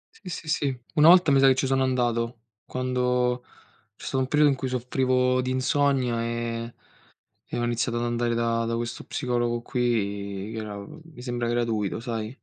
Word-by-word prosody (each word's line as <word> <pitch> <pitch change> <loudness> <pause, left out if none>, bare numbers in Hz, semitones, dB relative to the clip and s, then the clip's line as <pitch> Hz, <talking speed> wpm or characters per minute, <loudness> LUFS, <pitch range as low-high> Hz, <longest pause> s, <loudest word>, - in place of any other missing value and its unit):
Sì, 190 - -12
sì, 165 -2 -6
sì. 140 -4 0
Una 155 0 +6
volta 180 -3 +7
mi 135 - +5
sa 135 - +6
che 130 - +6
ci 135 - 0
sono 135 0 +2
andato, 120 -2 0 0.2
quando 125 -1 0 0.5
c'è - - -13
stato 135 - -1
un 130 - +1
periodo 150 +1 +4
in 135 - 0
cui 130 - -3
soffrivo 125 0 +1
di 130 - -2
insonnia 130 -2 +1
e 115 0 -3 0.7
e - - -4
ho - - -1
iniziato 120 0 0
ad 120 - -1
andare 120 0 0
da 115 0 0
da 115 0 -1
questo 120 0 -4
psicologo 120 -3 -1
qui, 100 -5 -2
che 115 - -5
era, 105 -2 -5
mi 155 0 -13
sembra 120 -1 -2
gratuito, 115 -4 -1
sai? 115 0 -4
125 Hz, 185 wpm, -26 LUFS, 115-130 Hz, 0.7 s, volta